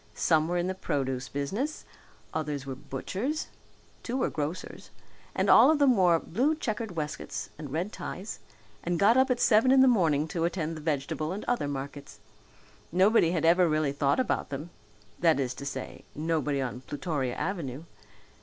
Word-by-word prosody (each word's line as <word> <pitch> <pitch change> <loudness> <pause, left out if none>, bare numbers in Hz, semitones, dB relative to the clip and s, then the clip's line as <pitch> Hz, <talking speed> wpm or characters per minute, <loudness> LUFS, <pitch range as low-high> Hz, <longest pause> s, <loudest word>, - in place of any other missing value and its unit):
Some 160 -1 +2
were 175 +1 -1
in 175 - 0
the 185 - -1
produce 135 -7 -2
business, 200 - -3 0.5
others 150 -3 -3
were 135 - -4
butchers, 185 - -4 0.5
two 250 +2 -3
were 260 - 0
grocers, 155 +4 -5 0.5
and - - +1
all - - +8
of 315 - +4
them 280 -4 +4
wore 180 -4 +4
blue 260 - 0
checkered 220 - -4
waistcoats 150 -2 -4
and 145 -4 -7
red 175 +8 -2
ties 195 +4 -6 0.4
and 175 0 -1
got 205 +6 +5
up 260 +1 +4
at 250 -1 +1
seven 225 +2 +4
in 265 0 +6
the 265 - +7
morning 160 - +3
to 165 +1 -2
attend 165 -2 -2
the 155 - -8
vegetable 155 +1 -2
and 200 +3 -5
other 245 -12 0
markets. 140 0 -6 0.7
Nobody 185 +1 +4
had 165 -2 0
ever 175 +1 +5
really 155 -2 +1
thought 140 - +1
about 255 - 0
them 145 +5 -6 0.5
that 165 -5 +3
is 130 -2 -1
to 140 - -7
say, - - -6
nobody 150 -2 0
on 125 -1 -3
Plutoria 145 -3 -3
Avenue. 160 -7 -4
165 Hz, 175 wpm, -28 LUFS, 145-200 Hz, 0.7 s, all